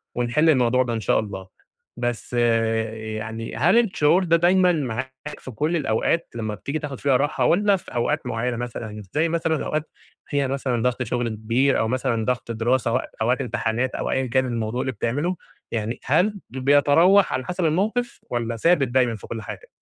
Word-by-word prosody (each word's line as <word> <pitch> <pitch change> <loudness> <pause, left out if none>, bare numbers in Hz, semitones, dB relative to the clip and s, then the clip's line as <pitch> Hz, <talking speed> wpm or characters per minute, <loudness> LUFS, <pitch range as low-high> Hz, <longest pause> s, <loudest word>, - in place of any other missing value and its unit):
ونِحِل 125 +7 +2
الموضوع 130 -2 +3
ده 120 -2 -3
إن 115 - -1
شاء - - +2
الله. 95 -3 -6 0.5
بس 120 0 -3
يعني 115 -1 -1
هل 170 - +4
الشعور 185 -5 +3
ده 170 -1 +3
دايمًا 180 +1 +4
معاك 130 +1 -4
في 130 - -9
كلّ 150 +9 -1
الأوقات 150 +3 0
لما 110 -2 -3
بتيجي 140 +9 -4
تاخد 140 -4 -6
فيها 135 -3 +3
راحة 145 +3 0
والّا 200 +3 +4
في 170 - -13
أوقات 145 +5 0
معينة 120 0 -2
مثلًا، 110 -3 -6
زي 160 +2 +2
مثلًا 165 -2 0
أوقات 155 0 -2 0.4
هي 140 -2 +1
مثلًا 130 -3 -1
ضغْط 125 0 0
شُغل 120 0 -1
كبير 115 +5 +1
أو 110 - +1
مثلًا 125 -2 -1
ضغْط 125 -1 -2
دراسة 115 +1 +1
أو - - +3
أو 110 - -4
وقت 125 +1 +2
إمتحانات 120 +1 -1
أو - - -2
أيًا 130 -1 0
كان 130 +2 +1
الموضوع 115 0 -2
اللي 130 - -1
بتعمله، 145 - -1 0.4
يعني 115 +1 -3
هل 170 +10 +3 0.2
ب 130 - -9
بيتراوح 145 +8 +5
على 130 - -2
حسَب 180 +1 -2
الموقِف 215 +9 0
والّا 120 -1 -2
ثابت 160 0 +3
دايمًا 120 -2 +2
في 105 - -11
كلّ 115 - -5
حاجة؟ - - -9
125 Hz, 185 wpm, -23 LUFS, 115-150 Hz, 0.5 s, بيتراوح